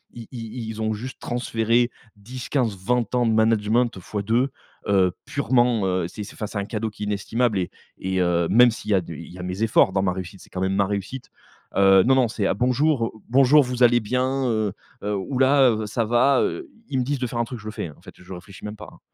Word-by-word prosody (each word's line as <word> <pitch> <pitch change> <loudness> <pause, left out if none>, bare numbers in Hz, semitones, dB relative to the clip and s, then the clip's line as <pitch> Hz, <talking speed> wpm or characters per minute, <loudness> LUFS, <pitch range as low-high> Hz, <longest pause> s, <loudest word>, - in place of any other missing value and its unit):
I 115 -2 -9
i 115 -1 -6
ils 110 0 -6
ont 110 0 0
juste 125 +5 -7
transféré, 120 0 0 0.3
10-15-20 120 0 -2
ans 120 -1 +2
de 115 - +2
management, 110 +1 +2
fois 100 +3 -4
2, 120 +6 +1 0.4
heu, 95 -3 +3
purement, 120 -6 +1
heu, 90 -2 0
c'est 105 +4 -7
c'est 100 - -11
enfin 105 - -4
c'est 100 0 -4
un 100 - -3
cadeau 110 0 -3
qui 105 - -16
est - - -2
inestimable 105 +2 0
et 90 - -2 0.3
et 95 0 -2
heu, 85 -1 +1
même 120 +4 +6
s'il 105 -1 -5
y - - +5
a 95 - +3
du 85 -3 -9
il 85 - -10
y 90 - -11
a - - -6
mes 90 +4 -3
efforts, 110 -3 +4
dans 95 0 0
ma 90 -1 +1
réussite, 95 0 -7
c'est - - -17
quand 90 - -4
même 95 +1 0
ma 100 -1 +3
réussite. 100 +6 -5 0.5
Heu, 95 -1 +6
non, 130 - +4
non 130 -3 +4
c'est: 110 -2 -3
«Ah - - +2
bonjour!», 125 +3 +1
heu, - - -5 0.2
«Bonjour 135 +3 +6
vous 125 0 -4
allez 120 0 +6
bien, 130 +4 -1
heu?» 110 -3 0 0.3
Heu, 105 0 -1
«Houlà!», 130 +5 +3
heu 110 -1 -2
«Ça 115 +2 -1
va?» 120 +4 +3
heu. 365 -3 -3 0.2
Ils 130 - 0
me - - +1
disent 140 +2 -1
de 125 - -2
faire 120 0 -4
un - - +2
truc 125 0 -7
je 105 - -14
le 110 - -4
fais, 95 - -5
hein, 75 - -12
en - - -22
fait, 90 - -14
heu, - - -15
je 90 - -14
réfléchis 95 +2 -12
même 105 +1 -6
pas, 105 - -11
hein. - - -18
110 Hz, 255 wpm, -23 LUFS, 100-125 Hz, 0.5 s, même